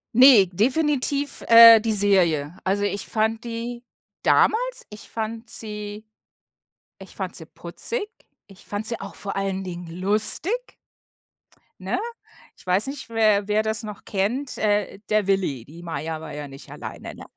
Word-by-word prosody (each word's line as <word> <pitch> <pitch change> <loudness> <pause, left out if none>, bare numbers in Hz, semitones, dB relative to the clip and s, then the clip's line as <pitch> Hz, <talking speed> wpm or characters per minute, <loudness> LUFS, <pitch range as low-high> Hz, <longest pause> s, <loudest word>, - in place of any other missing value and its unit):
Ne, 250 -5 +8
definitiv, 280 - 0
äh, 230 -1 +10
die 220 0 -1
Serie. 180 -7 +2
Also 200 +2 +1
ich 205 -1 -2
fand 220 +1 0
die 235 +1 -5 0.4
damals - - +2
ich 210 +1 -12
fand 225 +1 -5
sie 210 -1 -6 0.9
ich - - -13
fand - - -4
sie - - -6
putzig, 460 -3 -6 0.4
ich 195 -2 -17
fand 205 +1 -4
sie 230 0 -2
auch - - -8
vor 200 - -6
allen 195 -1 -2
Dingen 175 -1 -7
lustig, 215 - -1 1.0
ne? - - -2 0.6
Ich - - -20
weiß 185 +7 +1
nicht, 275 -1 -6
wer 215 -3 +2
wer 210 +1 +2
das 220 -1 -1
noch 210 -1 -8
kennt, 230 +8 -2
äh, 205 -2 0
der 215 -2 +2
Willi, 185 -11 0
die 165 +6 -13
Maja 160 -1 -4
war 155 -1 -8
ja 150 0 -6
nicht 135 0 -12
alleine, - - -8
ne? - - -11
210 Hz, 150 wpm, -23 LUFS, 190-230 Hz, 1.0 s, äh